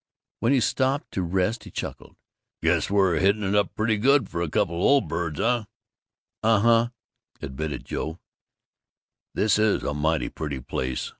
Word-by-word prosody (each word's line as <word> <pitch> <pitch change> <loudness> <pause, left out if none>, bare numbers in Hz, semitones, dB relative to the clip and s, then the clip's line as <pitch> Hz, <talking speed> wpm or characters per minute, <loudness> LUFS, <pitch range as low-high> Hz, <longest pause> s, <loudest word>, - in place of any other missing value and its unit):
When 115 - +2
he 140 - +4
stopped 135 +6 0
to 95 - -2
rest 95 +6 0
he - - -10
chuckled, - - -7 0.5
"Guess - - +2
we're 95 -4 +3
hitting 100 +2 +2
it 95 +1 0
up 105 0 +1
pretty 110 0 +1
good 140 +6 +3
for 85 - -3
a 85 - -1
couple 85 +2 0
o' - - -2
old 140 +1 +4
birds, 85 -1 -3
eh?" 120 -2 +1 0.8
"Uh 110 -1 +4
huh," 115 +2 +4 0.5
admitted 75 +3 -5
Joe. 80 +2 -4 1.2
"This 105 0 +2
is 110 -1 +2
a 70 - -1
mighty 80 +2 0
pretty 75 -4 -5
place. 65 0 -3
100 Hz, 165 wpm, -25 LUFS, 80-115 Hz, 1.2 s, he